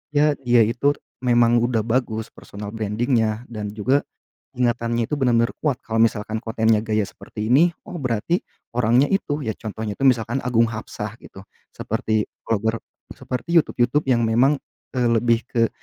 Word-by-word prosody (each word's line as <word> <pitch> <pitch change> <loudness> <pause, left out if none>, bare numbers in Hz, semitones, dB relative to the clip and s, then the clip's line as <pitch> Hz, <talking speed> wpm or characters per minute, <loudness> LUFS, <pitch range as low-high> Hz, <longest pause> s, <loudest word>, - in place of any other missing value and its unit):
ya, 150 +1 +5
dia 120 -3 +4
itu, 130 +6 +1 0.3
memang 120 -1 +4
udah 120 -2 +1
bagus, 115 -1 -1
personal 100 0 -9
branding-nya, 110 +1 0
dan 105 -2 -4
juga, 130 +7 +2 0.6
ingatannya 120 -1 +1
itu - - -6
benar-benar 120 -4 +2
kuat, 145 -5 +1
kalau 115 0 +1
misalkan 110 -1 -1
kontennya 110 -1 +2
gaya 110 -2 0
seperti 105 +1 -7
ini, 165 +7 +5 0.2
oh - - -7
berarti 125 - 0 0.3
orangnya 120 +3 +4
itu, 155 -6 -1
ya 110 - -1
contohnya 110 -1 -5
itu - - -15
misalkan 120 +1 +1
Agung 115 -2 +3
Hapsah 110 -2 -5
gitu, 95 +1 -13 0.2
seperti 110 -1 -1 0.2
vlogger 110 +1 -1 0.3
seperti 125 +7 -5
YouTube 165 -3 +3
YouTube 145 +5 0
yang 120 -2 +3
memang, 125 +6 +3 0.4
eee, 125 - +2
lebih 115 0 +2
ke, 115 -3 +1
115 Hz, 155 wpm, -22 LUFS, 110-125 Hz, 0.6 s, ya